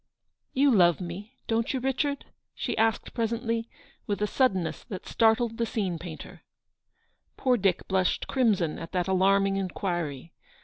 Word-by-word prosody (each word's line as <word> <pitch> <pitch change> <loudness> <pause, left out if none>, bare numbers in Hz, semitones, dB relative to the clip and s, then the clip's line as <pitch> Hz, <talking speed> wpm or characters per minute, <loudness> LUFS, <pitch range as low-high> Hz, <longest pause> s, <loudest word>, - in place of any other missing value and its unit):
* - - -53
You 285 -1 +6
love 175 - +5
me, 190 +7 -7
don't 230 +3 0
you, - - 0
Richard? 270 +2 -1 0.2
" - - -56
she - - -2
asked 225 0 +1
presently, 230 0 -1 0.4
with 205 - -1
a - - +4
suddenness 195 -7 0
that 190 -3 -7
startled 225 0 +2
the 230 - +2
scene 190 -8 -2
painter. 165 -2 -9 1.0
Poor 255 -2 +3
Dick 195 -5 +1
blushed 190 -1 +1
crimson 210 - +1
at 165 - -8
that 180 -1 0
alarming 195 +1 +3
inquiry. 175 -6 -3
200 Hz, 150 wpm, -27 LUFS, 180-230 Hz, 1.0 s, You